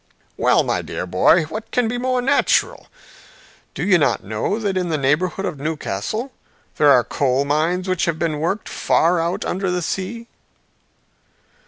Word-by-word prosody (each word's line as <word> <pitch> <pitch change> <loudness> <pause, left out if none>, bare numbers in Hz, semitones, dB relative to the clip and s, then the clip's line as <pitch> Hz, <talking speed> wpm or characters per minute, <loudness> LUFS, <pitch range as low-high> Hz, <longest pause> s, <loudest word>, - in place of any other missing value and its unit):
"Well, - - +3
my - - -1
dear - - -5
boy, 95 - +4
what 215 +8 -7
can 250 -2 +1
be 245 +2 -2
more 255 0 0
natural! 285 - +1 0.9
Do - - -3
you 190 -3 +4
not 130 -8 +1
know 110 - -2
that 205 -4 -2
in 180 -2 -1
the 160 - 0
neighborhood 155 +7 0
of 155 -7 -4
Newcastle 160 - -3 0.5
there 150 - +5
are 125 -3 +6
coal 135 +1 0
mines 165 +6 0
which 185 0 0
have 170 -3 -1
been 160 -3 -1
worked 180 +7 -2
far 170 +2 +1
out 170 +2 -2
under 190 +1 -2
the 180 -1 -1
sea?" 195 +7 -4
175 Hz, 165 wpm, -20 LUFS, 150-200 Hz, 0.9 s, are